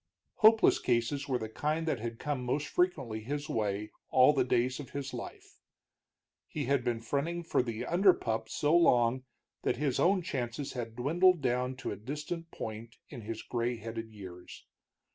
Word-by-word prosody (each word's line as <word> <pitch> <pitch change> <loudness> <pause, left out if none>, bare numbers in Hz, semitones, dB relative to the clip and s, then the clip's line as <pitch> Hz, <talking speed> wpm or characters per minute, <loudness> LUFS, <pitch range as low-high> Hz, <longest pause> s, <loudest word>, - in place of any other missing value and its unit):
Hopeless 220 0 +6
cases 125 +4 0
were 130 -2 +1
the 110 - -4
kind 155 +8 -2
that 145 -6 0
had 115 +1 -5
come 145 -2 -3
most 140 +4 -1
frequently 135 -12 0
his 145 +6 -4
way 105 -1 -2 0.2
all 130 +3 +6
the 135 -3 +2
days 125 +1 +1
of 140 - -8
his 140 -2 -5
life. 120 - -9 0.9
He 150 -3 -4
had 140 -1 +1
been 120 -2 -1
fronting 150 +8 -2
for 165 - +1
the 120 -1 -4
under 190 +3 +5
pup 110 0 -3
so 150 +7 +2
long 130 -6 +4 0.4
that - - 0
his 140 -2 0
own 185 +1 +3
chances 135 -3 -3
had 115 -3 -5
dwindled 170 +8 +3
down 125 +1 0
to 130 - -5
a - - -3
distant 150 +8 -5
point 110 -2 -7
in 125 -5 -8
his 110 +1 -6
gray 120 0 -1
headed 115 0 -6
years. 95 -4 -11
125 Hz, 175 wpm, -31 LUFS, 115-150 Hz, 0.9 s, Hopeless